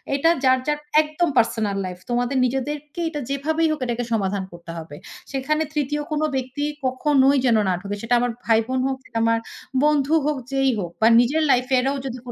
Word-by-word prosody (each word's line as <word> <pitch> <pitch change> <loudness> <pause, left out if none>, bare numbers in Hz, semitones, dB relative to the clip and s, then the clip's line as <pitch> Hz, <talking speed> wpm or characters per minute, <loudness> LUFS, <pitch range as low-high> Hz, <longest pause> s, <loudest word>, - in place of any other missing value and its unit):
এটা 285 +4 +3
যার, 260 0 +5
যার 295 0 0 0.2
একদম 310 +3 -1
পার্সোনাল 225 -3 +1
লাইফ। 180 -1 -6
তোমাদের 245 +2 0
নিজেদেরকে 290 +5 -3
এটা 300 -2 -5
যেভাবেই 310 +4 0
হোক, 310 - -2
এটাকে 240 0 -2
সমাধান 200 -2 0
করতে 170 -1 -10
হবে। 160 -2 -8 0.4
সেখানে 290 +3 0
৩য় 295 0 -1
কোনো 305 0 +1
ব্যক্তি 260 +2 -3 0.2
কখনোই 270 +1 +3
যেন 235 -3 +4
না - - +2
ঢোকে।" 200 +1 -4
সেটা 230 +1 -1
আমার 245 0 0
ভাই 225 -1 +4
বোন 260 0 -1
হোক, 265 -1 -2 0.3
আমার 230 0 +2 0.4
বন্ধু 300 0 +3
হোক, 300 -1 0
যেই 270 0 +2
হোক 175 -3 -4
বা 220 - +6
নিজের 285 +7 +2
লাইফ 250 0 +3
এরও 270 +2 0
যদি 255 -2 -4
265 Hz, 185 wpm, -22 LUFS, 230-295 Hz, 0.4 s, বা